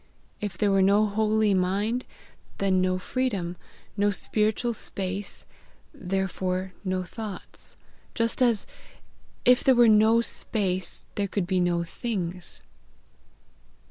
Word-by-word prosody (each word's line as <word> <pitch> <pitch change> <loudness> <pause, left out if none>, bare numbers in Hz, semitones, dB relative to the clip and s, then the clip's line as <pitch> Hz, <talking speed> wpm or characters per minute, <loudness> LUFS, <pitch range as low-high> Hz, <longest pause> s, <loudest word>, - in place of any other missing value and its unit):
If 205 -4 -4
there 205 +1 +2
were 195 0 +4
no 200 +3 +5
holy 215 0 +2
mind, 200 +6 0 0.5
then 190 -2 +2
no 185 0 +1
freedom, 195 -4 -2 0.4
no 205 0 +2
spiritual 215 +3 0
space, 195 -1 -4 0.5
therefore 190 -4 -2
no 185 -1 -1
thoughts; 205 +1 -9 0.4
just 230 +2 0
as, 235 -5 +3 0.8
if 250 +1 +5
there 265 - +5
were 240 -1 +6
no 220 +1 +6
space, 190 -5 -3
there 200 -1 -1
could 195 -1 -1
be 185 0 +1
no 175 -1 +1
things." 180 -2 -5
200 Hz, 115 wpm, -26 LUFS, 185-220 Hz, 0.8 s, were